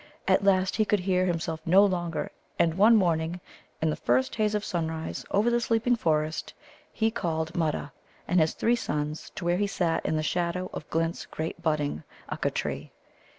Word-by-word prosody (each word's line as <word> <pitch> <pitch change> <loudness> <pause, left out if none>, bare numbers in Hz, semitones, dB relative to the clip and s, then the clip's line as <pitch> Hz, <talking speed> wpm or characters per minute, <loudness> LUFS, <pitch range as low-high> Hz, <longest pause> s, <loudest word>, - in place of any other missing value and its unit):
At - - +4
last 190 -1 +3
he 220 - +4
could 210 -2 +1
hear 185 0 +1
himself 165 -2 -2
no 190 +5 +6
longer, 175 -4 -2 0.3
and 165 -1 +3
one 210 +6 +6
morning, 170 -3 +1 0.4
in 160 - +3
the - - -1
first 125 +2 +1
haze 215 -1 +1
of 210 0 -1
sunrise 160 -2 -3
over 215 +4 +2
the 240 0 +2
sleeping 230 +2 +2
forest, 155 -6 -1 0.4
he 225 0 +1
called 160 -5 -2
Mutta 155 -3 -1 0.4
and 180 +1 +3
his 155 0 +2
three 235 +1 +2
sons 150 -8 -3
to 170 - -5
where 175 +1 +2
he 205 +1 +1
sat 175 -4 0
in - - 0
the 155 - 0
shadow 175 +3 -1
of 150 - -7
Glint's 165 +1 -1
great 160 +1 -5
budding 150 - -1 0.3
Ukka - - -1
tree. - - -4
175 Hz, 185 wpm, -27 LUFS, 160-200 Hz, 0.4 s, no